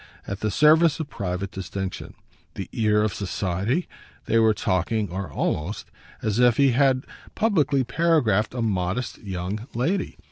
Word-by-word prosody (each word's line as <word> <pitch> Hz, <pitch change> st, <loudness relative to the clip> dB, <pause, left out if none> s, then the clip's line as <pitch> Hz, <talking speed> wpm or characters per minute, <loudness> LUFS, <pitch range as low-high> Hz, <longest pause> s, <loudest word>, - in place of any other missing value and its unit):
at 100 Hz, 0 st, -5 dB
the 110 Hz, -, -1 dB
service 155 Hz, -, +5 dB
of 150 Hz, -2 st, -5 dB
private 95 Hz, 0 st, -3 dB
distinction. 95 Hz, 0 st, -5 dB, 0.4 s
The 95 Hz, -, -5 dB
ear 105 Hz, -3 st, +2 dB
of 110 Hz, -, 0 dB
society? 100 Hz, -, -1 dB, 0.4 s
they 115 Hz, -, +3 dB
were 110 Hz, -1 st, +4 dB
talking, 100 Hz, +1 st, 0 dB
or 95 Hz, -3 st, -4 dB
almost, 75 Hz, +8 st, -2 dB, 0.3 s
as 110 Hz, +1 st, 0 dB
if 125 Hz, -2 st, +5 dB
he 140 Hz, -2 st, +5 dB
had 130 Hz, 0 st, +2 dB, 0.3 s
publicly 150 Hz, -, +2 dB
paragraphed 125 Hz, -, +1 dB
a 120 Hz, -, -1 dB
modest 100 Hz, +3 st, -2 dB
young 100 Hz, +3 st, -5 dB
lady. 175 Hz, +11 st, -1 dB
110 Hz, 145 wpm, -24 LUFS, 95-135 Hz, 0.4 s, service